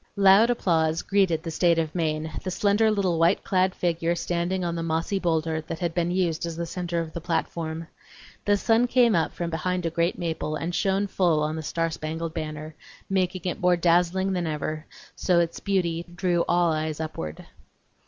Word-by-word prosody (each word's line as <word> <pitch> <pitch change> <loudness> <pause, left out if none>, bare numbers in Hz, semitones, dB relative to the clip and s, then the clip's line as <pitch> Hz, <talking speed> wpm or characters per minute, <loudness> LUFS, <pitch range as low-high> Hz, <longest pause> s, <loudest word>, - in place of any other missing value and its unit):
Loud 200 +3 +6
applause 165 -8 +1
greeted 190 -5 +2
the 165 - -4
state 170 +1 +3
of 160 -1 -1
Maine, 155 -2 -1
the 185 - -3
slender 205 +4 +2
little 190 -6 +1
white 170 +4 +3
clad 185 0 +1
figure 170 -1 0
standing 175 +2 -1
on 170 - -1
the 170 - -3
mossy 165 +4 -1
boulder 160 -2 0
that 160 +1 -6
had 170 -1 -2
been 175 0 0
used 175 -3 0
as 165 - -5
the 170 +1 -3
centre 175 0 -3
of 165 -1 -4
the 170 - -5
platform. 165 -1 -2 0.6
The 205 0 +3
sun 225 +3 +3
came 240 -2 +4
up 165 -3 +1
from 170 -1 -4
behind 180 +2 -2
a 165 - 0
great 170 +2 0
maple 160 -3 -3
and 165 +3 -3
shone 195 +1 +1
full 175 -6 +1
on 155 +1 -1
the 160 - -4
star 165 +2 -1
spangled 160 +1 -4
banner, 155 -1 -5 0.4
making 185 -2 0
it 180 - -3
more 180 0 +4
dazzling 180 +3 +2
than 175 -2 -1
ever, 155 +1 -3 0.3
so 180 -2 +1
that 170 - +5
its 170 - -5
beauty 175 -4 0
drew 175 -2 +1
all 175 -1 +3
eyes 155 0 -2
upward. 80 - -5
170 Hz, 195 wpm, -25 LUFS, 160-185 Hz, 0.6 s, Loud